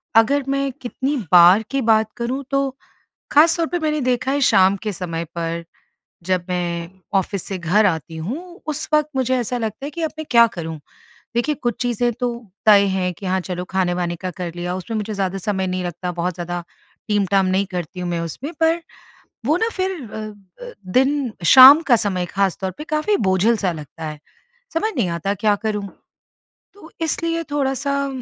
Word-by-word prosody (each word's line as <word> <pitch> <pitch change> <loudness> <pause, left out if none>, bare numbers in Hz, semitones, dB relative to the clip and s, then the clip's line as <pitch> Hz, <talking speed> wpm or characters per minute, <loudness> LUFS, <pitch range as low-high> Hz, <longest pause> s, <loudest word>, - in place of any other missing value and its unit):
अगर 275 +6 +4
मैं 275 0 0
कितनी 265 +3 -2 0.2
बार 180 +4 +7
की 275 0 0
बात 220 -1 +3
करूँ 255 +4 -2
तो, 275 0 +1 0.6
ख़ास 320 +3 +5
तौर 330 -1 0
पे 350 - -2
मैंने 305 -2 0
देखा 255 +1 0
है 285 - 0
शाम 190 -6 +5
के 215 - -1
समय 170 -2 -4
पर, 170 0 -3 0.6
जब 180 -1 0
मैं 170 -1 -2 0.3
ऑफिस 195 0 -4
से 195 - -5
घर 180 +5 +2
आती 165 -3 -1
हूँ, 335 - -6
उस 310 0 -3
वक़्त 300 0 +3
मुझे 260 0 +1
ऐसा 245 +1 -2
लगता 225 +4 -4
है - - -3
कि 335 +3 -6
अब 320 - -1
मैं 315 - -4
क्या 235 -1 +7
करूँ? 165 -7 -6 0.6
देखिए 295 +6 +1
कुछ 240 -6 -2
चीज़ें 240 0 0
तो, 235 -2 -4 0.2
तय 205 -2 +7
है 180 -1 0
कि 190 +3 -9
हाँ 185 +1 +1
चलो 180 0 -5
खाने-वाने 175 -2 0
का 185 +2 -5
कर 180 -1 -6
लिया, 175 +1 -3
उसमें 220 +5 -5
मुझे 215 0 -3
ज़्यादा 195 -1 -2
समय 190 0 -1
नहीं 185 0 -2
लगता, 175 +1 -4
बहुत 175 +1 -2
ज़्यादा 175 0 -4 0.5
टीम-टाम 195 -2 +2
नहीं 190 +2 +1
करती 180 0 -5
हूँ, 180 - -3
मैं 170 -1 -1
उसमें 215 - -5
पर 325 +1 +3 0.7
वो 310 +4 +3
ना 450 +4 +1
फिर 375 0 -1 0.2
अ - - -6 0.5
अ, - - -8 0.2
दिन 265 -1 +2
शाम 270 +4 +10
का 250 -6 +4
समय 190 -5 -1
ख़ास 195 0 0
तौर 190 -1 -2
पे, 300 +10 -9
काफ़ी 310 +7 +1
बोझिल 195 - +2
सा 190 -4 -1
लगता 160 0 -9
है। 150 -1 -5 0.6
समझ 430 +7 0
नहीं 215 -7 +1
आता 170 +4 -2
क्या 210 +1 +2
करूँ? 210 -2 -2 0.9
तो 400 -5 -15
इसलिए 330 +1 -1
थोड़ा-सा, 280 0 0
210 Hz, 190 wpm, -21 LUFS, 180-275 Hz, 0.9 s, शाम